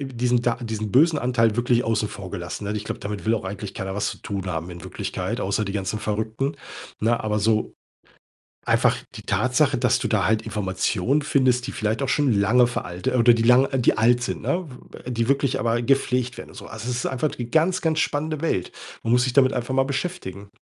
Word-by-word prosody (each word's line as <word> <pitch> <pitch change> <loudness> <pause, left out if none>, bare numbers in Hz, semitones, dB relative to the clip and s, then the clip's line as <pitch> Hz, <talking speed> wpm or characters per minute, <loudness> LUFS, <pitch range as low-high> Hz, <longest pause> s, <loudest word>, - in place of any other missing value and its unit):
diesen 125 -3 0
da 120 -1 +2
diesen 110 -2 -3
bösen 155 - +4
Anteil 115 -4 +2
wirklich 120 0 +2
außen 110 -2 0
vor 95 -2 -8
gelassen, 90 +1 -5
ne, 105 - -2
ich 105 - -4
glaube, - - -4
damit 105 0 -5
will 115 - +3
auch 110 - -3
eigentlich 100 +1 -6
keiner 95 0 -4
was 105 - -1
zu - - -6
tun 100 -2 -4
haben 85 0 -3
in 85 0 -9
Wirklichkeit, - - -4
außer 100 +2 0
die 100 - -3
ganzen 105 +1 -2
Verrückten, 110 +7 -2 0.4
ne? 115 +2 +1
Aber 105 0 0
so 110 +1 +1 0.9
einfach - - +3 0.2
die - - -8
Tatsache, - - +2
dass - - +2
du - - -2
da - - +1
halt 110 0 +2
Informationen 105 +7 0
findest, 130 -4 +2
die 135 - -4
vielleicht 110 +5 -1
auch 135 - -1
schon 145 -4 +2
lange 120 +4 +4
veralte 90 0 -3
oder 120 0 +6
die 115 - 0
lang 125 +3 +6
äh, 135 - 0
die 120 - +3
alt 120 +2 +4
sind, - - -3
ne? 175 -1 -1 0.2
W - - -10
äh, 125 - -7
die 115 0 0
wirklich 140 -1 +1
aber 115 +1 +1
gepflegt 125 -1 +1
werden - - -9
und - - -15
so. - - -9
Also 110 +3 -6
es 125 - -1
ist - - -3
einfach 135 +3 -1
die 120 -1 -6
ganz, 180 +4 +2
ganz 160 -1 +1
spannende 155 +1 -1
Welt. 95 - -1 0.3
Man 115 - -2
muss 125 0 +4
sich 130 -2 -1
damit 135 -1 +4
einfach 125 +1 -2
mal 135 0 +3
beschäftigen. 135 - -4
120 Hz, 225 wpm, -23 LUFS, 105-130 Hz, 0.9 s, oder